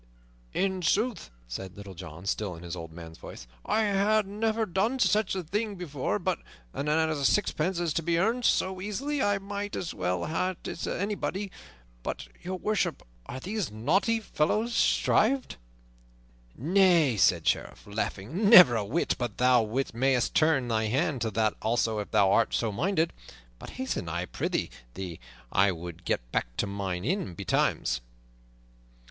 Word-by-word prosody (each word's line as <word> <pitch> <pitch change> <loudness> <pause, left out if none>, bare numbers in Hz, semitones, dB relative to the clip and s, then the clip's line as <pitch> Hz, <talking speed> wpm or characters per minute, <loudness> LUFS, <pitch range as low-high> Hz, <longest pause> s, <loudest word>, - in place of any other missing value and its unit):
"In 190 -1 0
sooth," 215 - 0 0.2
said 95 +11 -7
Little 100 -1 -9
John, 90 0 -9
still 100 -2 -2
in 85 +1 -10
the 85 - -4
old 80 -2 -7
man's 80 0 -10
voice, 60 - -10 0.2
"I 220 - +1
ha' 210 +2 +3
never 220 +2 0
done 210 +7 0
such 210 -5 +2
a 185 - -2
thing 205 +5 -2
before; 145 - -2
but - - -1 0.3
an 140 - -3
a 155 -1 +1
sixpence 185 +1 +1
is 170 -3 0
to 165 - 0
be 170 +1 +1
earned 225 +7 +1
so 190 -4 +1
easily 270 +9 -2
I 205 -3 +2
might 200 +1 -5
as 170 - -3
well 90 -1 -1
ha' 180 +4 0
it - - -3
as - - -4
anybody. 200 0 -2 0.5
But, - - -5
Your 185 +1 -4
Worship, 210 +2 -1 0.2
are 130 - -6
these 200 +6 -3
naughty 175 - +1
fellows 215 +4 0
shrived?" 255 +3 +2 1.0
"Nay," 170 - +4
said 90 -4 +4
the - - +3
Sheriff, - - -2
laughing, 110 - -2
"never 180 - +10
a 110 - 0
whit; 130 +12 0
but 120 -5 -3
thou 125 -2 +5 0.3
mayst 130 +1 +1
turn 155 -6 +3
thy 110 -1 +1
hand 135 +4 0
to 115 - 0
that 110 +1 +1
also 110 -1 +1
if 105 - -5
thou 100 -3 +4
art 115 +2 +3
so 115 -2 0
minded. 165 - 0 0.5
But - - -9
hasten, 260 - -3
I 85 +2 -2
prythee, - - -2 0.2
for 90 -4 -5 0.3
I 100 0 +4
would 85 0 -8
get - - -2
back - - -2
to - - +1
mine 100 -2 -3
inn 150 - -1
betimes." 60 -5 0
150 Hz, 165 wpm, -28 LUFS, -, 1.0 s, never